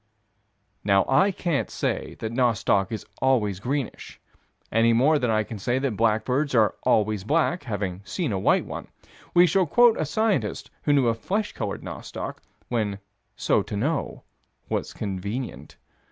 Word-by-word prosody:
Now, 100 Hz, -1 st, +3 dB
I 140 Hz, +9 st, +4 dB
can't 175 Hz, -6 st, -1 dB
say -, -, -3 dB
that 110 Hz, -, -4 dB
nostoc 115 Hz, -5 st, +2 dB
is 110 Hz, -, -5 dB, 0.2 s
always 110 Hz, -8 st, +2 dB
greenish, 130 Hz, +3 st, -4 dB, 0.5 s
any 115 Hz, +1 st, +4 dB
more 145 Hz, +6 st, +4 dB
than 125 Hz, -3 st, 0 dB
I 110 Hz, -1 st, +2 dB
can 110 Hz, 0 st, -8 dB
say 120 Hz, +6 st, 0 dB
that 135 Hz, -4 st, -1 dB
blackbirds 115 Hz, +6 st, +1 dB
are 110 Hz, -4 st, +4 dB
always 105 Hz, -2 st, +2 dB
black, 160 Hz, -, +1 dB
having 100 Hz, -5 st, -3 dB
seen 160 Hz, -, -2 dB
a 95 Hz, -, -1 dB
white -, -, +3 dB
one: -, -, -7 dB, 0.5 s
we 175 Hz, +1 st, +8 dB
shall 180 Hz, +1 st, +2 dB
quote 240 Hz, +7 st, +5 dB
a -, -, +1 dB
scientist 215 Hz, +7 st, -1 dB
who 145 Hz, -, +1 dB
knew 140 Hz, -3 st, +4 dB
of 115 Hz, -1 st, +1 dB
flesh 205 Hz, -, -1 dB
colored 105 Hz, -4 st, -4 dB
nostoc, -, -, -6 dB, 0.3 s
when 105 Hz, -5 st, -1 dB, 0.4 s
so -, -, +2 dB
to 105 Hz, -, -5 dB
know 140 Hz, +7 st, -2 dB, 0.5 s
was -, -, -2 dB
convenient. 100 Hz, -, -5 dB
120 Hz, 155 wpm, -25 LUFS, 105-145 Hz, 0.5 s, we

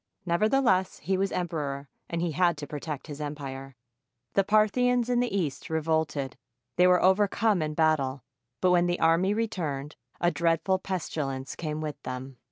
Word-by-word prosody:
Nevertheless, 190 Hz, +1 st, +2 dB
he 190 Hz, +5 st, -1 dB
was 195 Hz, +1 st, 0 dB
emperor, 145 Hz, -6 st, -3 dB, 0.2 s
and 170 Hz, 0 st, -2 dB
he 170 Hz, -, 0 dB
had 170 Hz, 0 st, +2 dB
to 145 Hz, -, -5 dB
protect 150 Hz, 0 st, -5 dB
his 150 Hz, -1 st, -7 dB
empire. 135 Hz, -2 st, -6 dB, 0.6 s
The 195 Hz, -, +4 dB
Parthians 235 Hz, +4 st, +3 dB
in 245 Hz, -, +3 dB
the 245 Hz, 0 st, +1 dB
East 170 Hz, -9 st, -2 dB
revolted. 160 Hz, -4 st, -1 dB, 0.4 s
They 180 Hz, +1 st, +5 dB
were 180 Hz, -1 st, +4 dB
overcome 200 Hz, +1 st, +3 dB
in 155 Hz, 0 st, -2 dB
battle, 145 Hz, -4 st, +1 dB, 0.4 s
but 180 Hz, -, +4 dB
when 175 Hz, 0 st, +4 dB
the 175 Hz, 0 st, 0 dB
army 170 Hz, +5 st, +3 dB
re 225 Hz, +1 st, +1 dB
turned, 150 Hz, -8 st, -4 dB, 0.2 s
a 175 Hz, 0 st, +3 dB
dreadful 165 Hz, +4 st, +1 dB
pestilence 145 Hz, -8 st, -3 dB
came 155 Hz, -2 st, -4 dB
with 150 Hz, -2 st, -5 dB
them. 130 Hz, 0 st, -6 dB
165 Hz, 165 wpm, -28 LUFS, 145-190 Hz, 0.6 s, They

